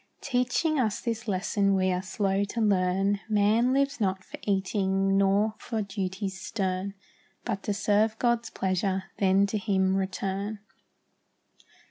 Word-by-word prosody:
Teaching 270 +4 +1
us 220 -5 0
this 230 -1 -3
lesson 195 0 +1
we 185 0 +2
are 180 0 0
slow 195 +1 0
to 205 +3 -4
learn; 195 -1 +2
Man 215 +4 +3
lives 275 -2 +1
not 190 -2 0
for - - -10
eating, 195 -1 +1
nor 200 +2 +3
for 225 -3 -3
duties 195 -1 -4
stern, 190 0 -2 0.5
But 195 - -2
to 205 - 0
serve 215 +1 +2
God's 235 -1 +1
pleasure, 190 0 -1 0.2
then 195 0 +4
to 210 +1 -2
Him 190 -2 +1
return. 195 +2 -2
200 Hz, 135 wpm, -27 LUFS, 190-215 Hz, 0.5 s, then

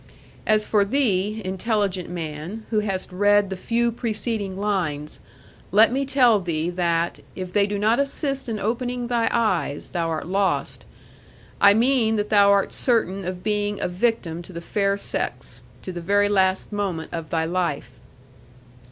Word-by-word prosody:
As 215 0 +3
for 210 -2 +3
thee, 215 -3 0
intelligent 190 -1 -1
man, 170 +5 -6
who 215 - +3
hast 195 -3 -3
read 205 +1 +3
the - - -2
few 235 +5 0
preceding 220 -4 -3
lines, 175 -8 -2 0.5
let 215 +5 +5
me 270 +2 -1
tell 245 -6 +4
thee 170 -2 -2
that, 170 -1 0 0.2
if 185 -1 -6
they 200 -1 +3
do 205 0 -2
not 220 +4 +2
assist 275 -2 -1
in 220 - -2
opening 245 +4 -2
thy 235 -2 +1
eyes, 185 -11 0
thou 170 -2 -2
art 160 -1 -3
lost; 195 +2 -1 0.8
I 200 0 +7
mean 230 -1 +3
that 210 -1 -1
thou 205 -2 +5
art 200 -1 +3
certain 205 -6 +1
of 180 0 -5
being 205 -1 -1
a - - -1
victim 180 -3 -1
to 175 - -12
the 170 - -6
fair 200 +3 0
sex 125 -9 -4 0.2
to 185 - -5
the 175 -1 -6
very 205 +4 +2
last 190 0 +1
moment 185 -6 -3
of 165 -2 -5
thy 160 -1 0
life. 170 -4 -2
200 Hz, 160 wpm, -23 LUFS, 180-220 Hz, 0.8 s, I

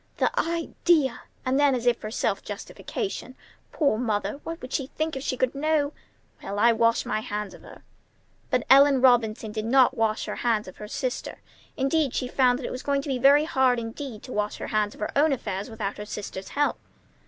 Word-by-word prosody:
"The - - +2
idea!" 330 -4 +1 0.2
And 260 +2 +2
then 285 -2 +4
as 245 -1 -3
if 245 -1 +4
for 215 - -6
self 220 - -1
justification: 385 - -5 0.4
"Poor 280 -9 +1
mother! 210 0 -1
What 330 0 -5
would 255 - -9
she 270 - -1
think 315 +2 -3
if 265 - -4
she 255 -1 -2
could 255 -1 +1
know? 295 0 +1 0.5
Well, 200 +1 -5
I 235 +3 +5
wash 230 0 +2
my - - -1
hands 210 -1 -4
of - - -13
her." - - -14 0.7
But 250 - +1
Ellen 275 0 +6
Robinson 230 -4 +3
did 215 0 -4
not 260 +2 +4
wash 225 -2 0
her - - -5
hands 225 -4 0
of 185 - -11
her 210 - -8
sister. 255 +3 -4 0.4
Instead, 275 0 +1
she 255 - -1
found 250 -1 +3
that 255 - -6
it - - -4
was 255 - -5
going 280 -1 0
to 285 - -6
be 260 -2 -1
very 280 +3 +6
hard 260 -5 +2
indeed 230 0 -6
to 255 - -8
wash 210 0 -1
her - - -6
hands 210 -1 0
of - - -15
her 210 - -2
own 300 +2 +4
affairs 200 -4 -4
without 215 -3 -4
her 210 - -5
sister's 195 -2 -6
help. 290 0 0
255 Hz, 210 wpm, -26 LUFS, 220-280 Hz, 0.7 s, Ellen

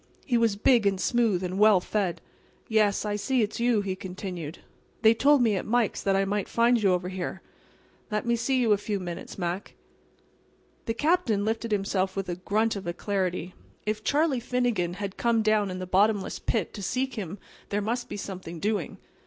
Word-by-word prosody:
He 250 - 0
was 230 -3 +3
big 220 +1 +4
and 195 -1 +1
smooth 225 -5 +1
and 185 +2 -3
well 210 -2 +6
fed. 190 -1 -2 0.5
"Yes, 215 -3 +2
I 205 0 -1
see 245 +3 +1
it's 210 - -3
you," 235 -3 +3
he 195 -2 -3
continued. 180 -4 -6 0.5
"They 220 +1 +7
told 275 +3 +4
me 220 -3 +3
at 185 - -2
Mike's 235 -1 +1
that 195 -1 +1
I 195 0 +2
might 200 0 -2
find 235 0 +3
you 195 -2 +4
over 180 0 -1
here. 190 0 -5 0.7
Let 210 0 -1
me 235 0 +2
see 255 +3 +1
you 235 -3 +2
a 205 - +1
few 205 -1 -2
minutes, 175 -1 -7
Mac." 180 +1 -4 1.1
The 225 - -1
Captain 290 - +1
lifted 225 +1 -2
himself 195 -2 0
with 195 -1 -3
a 175 - -1
grunt 215 +5 0
of 195 -3 -6
alacrity. 180 0 -2 0.3
If 215 0 -2
Charlie 290 -2 +2
Finnegan 235 -8 0
had 195 0 -5
come 230 -2 +2
down 215 -2 +2
in 185 - -4
the 185 - -4
bottomless 200 +2 +2
pit 215 -8 -1
to 205 - -7
seek 255 +7 -1
him 195 -4 -5 0.3
there 205 - 0
must 240 +4 -2
be - - -5
something 185 -4 -7
doing. 205 -2 -2
205 Hz, 195 wpm, -27 LUFS, 190-230 Hz, 1.1 s, They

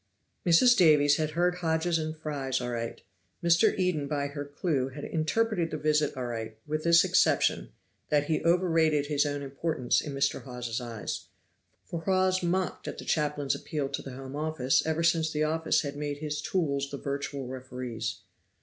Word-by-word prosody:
Mrs. 240 +9 +6
Davies 150 -6 +5
had 155 -1 0
heard 180 +1 +2
Hodges 165 0 +1
and 155 0 -4
Fry 145 -4 -4
aright. 120 -2 -4 0.4
Mr. 170 +5 +4
Eden 180 -6 0
by 145 -1 -1
her 145 0 -5
clew 145 -2 -1
had 140 +2 -8
interpreted 175 +2 0
the 155 - -3
visit 150 -2 +1
aright, 115 -3 -4
with 155 +1 -2
this 170 0 +6
exception, - - +2 0.4
that 145 -1 +3
he 155 +1 0
overrated 165 -4 +3
his 145 0 +1
own 145 0 -3
importance 135 -2 0
in 145 -3 -6
Mr. 140 0 0
Hawes's 125 -2 -5
eyes. 115 -3 -5 0.6
For 170 - -5
Hawes 185 +1 +2
mocked 180 +1 -1
at - - -5
the - - -8
chaplain's 145 -2 0
appeal 145 -3 -3
to 140 - -3
the 135 - -8
Home 135 +1 -8
Office 145 -3 +1
ever 160 +1 0
since 165 -1 +2
the 150 0 0
office 160 +1 +1
had 140 -2 -5
made 145 0 -3
his 150 0 -3
tools 140 -5 -1
the 140 - -5
virtual 140 -1 -4
referees. 125 -4 -5
150 Hz, 170 wpm, -29 LUFS, 135-165 Hz, 0.6 s, Mrs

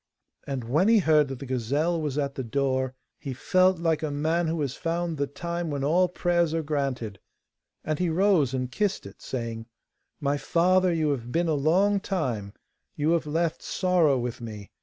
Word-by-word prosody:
And 135 -3 -3
when 150 - +2
he 230 0 +6
heard 155 -6 +4
that 135 -1 -5
the 140 - -8
gazelle 140 +7 0
was 150 -2 -2
at 140 -2 -1
the 130 - -4
door 130 +1 -1 0.2
he 135 -4 -5
felt 185 +7 +3
like 165 -2 0
a 155 - -1
man 160 +4 0
who 165 +1 -1
has 135 -3 -1
found 170 0 -2
the 140 - +1
time 170 +3 -4
when 140 -2 -2
all 175 +6 +3
prayers 175 -2 +1
are 165 - -1
granted, 135 -9 -2 0.6
and 155 -1 -2
he 180 -1 +1
rose 170 -5 +3
and 130 -1 -3
kissed 205 +6 -1
it, 100 - -12
saying: 115 -3 -5 0.5
'My 145 -1 0
father, 185 +4 +3
you 160 -3 +1
have 120 -3 -4
been 170 +3 +1
a 160 - +2
long 180 +8 +3
time; 125 - -3 0.4
you 150 +2 +1
have 165 -2 +1
left 165 +2 -1
sorrow 175 -7 +2
with 125 0 -4
me. 105 -3 -8
150 Hz, 190 wpm, -26 LUFS, 130-170 Hz, 0.6 s, he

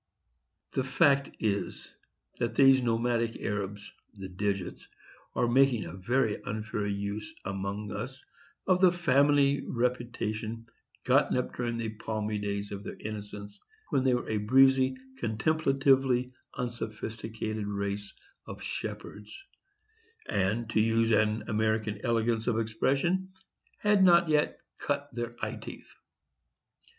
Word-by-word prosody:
The 130 - 0
fact 140 0 +3
is, 100 -3 -2 0.5
that 115 -1 -1
these 135 0 +6
nomadic 115 -1 0
Arabs, 100 0 -4 0.2
the 95 -2 -7
digits, 95 -1 -3 0.5
are 120 - +2
making 130 -2 +3
a 80 - -7
very 110 +4 0
unfair 105 0 -3
use, 100 +1 -3
among 100 +1 -4
us, 130 +6 -6 0.4
of 185 -1 +3
the 185 -2 +7
family 145 -4 +3
reputation 115 -2 -2 0.4
gotten - - +3
up 125 - -2
during 120 -1 -2
the 115 -1 -2
palmy 110 -1 -3
days 100 0 -3
of 100 0 -6
their - - -7
innocence, 105 -1 -7 0.3
when 130 - +2
they 130 -2 +3
were 125 - -3
a 110 - 0
breezy, 130 +4 +4 0.2
contemplatively 135 0 +2 0.2
unsophisticated 110 -2 -4
race 100 0 -3 0.4
of - - -8
shepherds, 105 0 -6 0.9
and, 105 +4 0
to 110 - +2
use 115 +1 +3
an 110 0 +2
American 110 -1 0
elegance 115 -2 +1
of 120 -3 +2
expression, 135 +12 0 0.5
had 205 -2 +3
not 170 -2 +6
yet 150 -1 +1 0.2
"cut 145 0 -2
their 120 0 -4
eye - - -5
teeth." - - -10
115 Hz, 120 wpm, -29 LUFS, 105-130 Hz, 0.9 s, the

